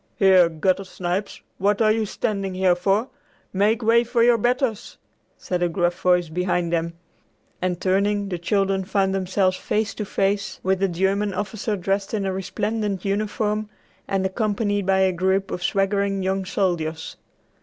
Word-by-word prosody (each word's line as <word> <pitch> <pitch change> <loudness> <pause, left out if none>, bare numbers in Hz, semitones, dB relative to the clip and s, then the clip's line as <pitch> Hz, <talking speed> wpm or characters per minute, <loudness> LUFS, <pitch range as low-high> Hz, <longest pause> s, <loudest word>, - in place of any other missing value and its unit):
"Here, 185 -3 +5
gutter 185 +4 0
snipes, 185 +1 -4 0.2
what 200 +1 +2
are 215 -1 +4
you 220 -1 0
standing 195 -2 -2
here 185 -1 +3
for? 195 +7 0 0.4
Make 215 +4 +2
way 230 +2 +4
for 240 0 +1
your 235 -1 +4
betters!" 245 -1 -1 0.4
said 180 -1 -3
a 175 - +2
gruff 175 +1 -1
voice 180 -2 +3
behind 175 +1 -1
them, 170 0 -1 0.7
and, 180 -1 -1
turning, 200 +1 +1
the 180 -2 -3
children 195 +1 0
found 190 0 0
themselves 185 0 +1
face 215 0 -1
to 210 - -4
face 200 +1 -1
with 190 0 +1
a 195 - +3
German 195 +3 0
officer 210 +1 -2
dressed 195 +3 -1
in 200 -2 -1
a 190 - -1
resplendent 205 +1 -2
uniform 210 +1 -1 0.4
and 195 -1 0
accompanied 205 0 -1
by 190 0 +3
a 190 0 +3
group 190 +2 0
of 180 - -4
swaggering 195 +1 0
young 190 0 -1
soldiers. 170 -5 -2
195 Hz, 160 wpm, -23 LUFS, 185-205 Hz, 0.7 s, Here